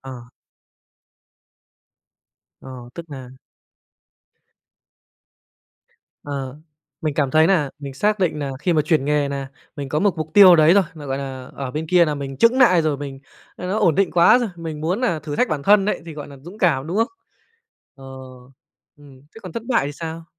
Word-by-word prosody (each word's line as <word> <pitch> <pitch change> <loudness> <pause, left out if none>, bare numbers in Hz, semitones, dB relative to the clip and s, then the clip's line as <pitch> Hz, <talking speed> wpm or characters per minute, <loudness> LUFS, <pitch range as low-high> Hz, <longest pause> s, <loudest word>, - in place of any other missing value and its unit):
Ờ. 135 0 -9 2.5
Ờ, 130 - -11 0.2
tức 170 -1 -9
nà 130 -3 -9 2.9
Ờ, 140 -2 -5 0.4
mình 155 -2 -2
cảm 140 -3 0
thấy 155 +2 +4
nà 165 -7 +1
mình 140 -2 -8
xác 210 +9 0
định 180 -5 0
nà 140 -2 -3
khi 175 +4 0
mà 155 -2 +2
chuyển 150 -2 +1
nghề 145 0 +1
nà 140 -1 -5 0.3
mình 140 -2 -5
có 150 - -1
một 195 +1 +1
mục 155 -1 -5
tiêu 190 -4 +9
đấy 155 +2 +5
rồi, 200 - +5
mà, 150 -3 -10
gọi 135 0 -3
là, 130 -2 -7
ở 135 -2 -5
bên 155 +4 -4
kia 175 +1 +4
là 150 -2 -2
mình 135 -1 -6
chững 230 - +3
nại 185 -10 +5
rồi, 155 -2 0
mình 140 -1 -7 0.4
là 180 - -6
nó 195 +4 -1
ổn 180 -7 +3
định 195 0 +1
quá 170 +8 +5
rồi, 240 -2 -2
mình 160 -3 -6
muốn 175 +8 -1
nà 235 -11 0
thử 150 -1 -6
thách 250 - +1
bản 150 -2 -2
thân 205 +4 +4
đấy 210 - -2
thì, 165 - -7
gọi 150 - -7
nà, 140 - -12
dũng 180 +7 -12
cảm, 150 -8 +1
đúng 175 +4 -3
không? 225 +1 +2 0.9
Ờ, 135 - -15 0.9
ừm. 140 -3 -17
Thế - - -10
còn 185 -4 -9
thất 225 - -6
bại 235 - +1
thì 145 - -4
sao? 165 +2 -7
155 Hz, 195 wpm, -21 LUFS, 140-180 Hz, 2.9 s, tiêu